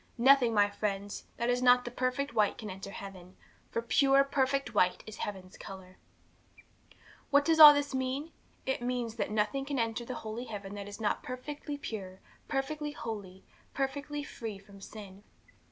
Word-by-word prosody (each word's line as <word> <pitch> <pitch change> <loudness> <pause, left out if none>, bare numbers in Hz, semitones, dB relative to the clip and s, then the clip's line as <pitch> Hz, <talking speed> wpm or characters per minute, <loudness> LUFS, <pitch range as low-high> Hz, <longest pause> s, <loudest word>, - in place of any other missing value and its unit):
'Nothing, 255 -1 +6
my 205 -2 +4
friends, 205 -1 -4
that 235 - -1
is 245 0 0
not 250 0 +5
perfect 255 +1 -1
white 215 -3 +2
can 215 -4 -6
enter 195 +1 -8
heaven, 190 -2 -10 0.3
for 230 - -2
pure, 275 +4 +4
perfect 275 -2 0
white 180 -3 +2
is 215 - -9
heaven's 190 -2 -6
colour. 185 -1 -10 1.3
'What 285 0 +4
does 320 0 +3
all 300 -1 +14
this 285 -1 0
mean? 265 +4 -2 0.3
It 265 -2 -1
means 240 -2 -2
that - - -1
nothing 215 +6 0
can 280 0 -3
enter 230 0 -1
that 255 - -5
holy 225 +2 -5
heaven 205 -4 -7
that 200 -1 -6
is 205 +1 -8
not 215 -2 0
perfectly 290 +3 -6
pure, 190 -8 -6 0.3
perfectly 295 +2 -2
holy, 200 -7 -7 0.3
perfectly 285 +2 -2
free 225 -7 -6
from 200 0 -16
sin. 200 -2 -10
235 Hz, 165 wpm, -31 LUFS, 205-275 Hz, 1.3 s, all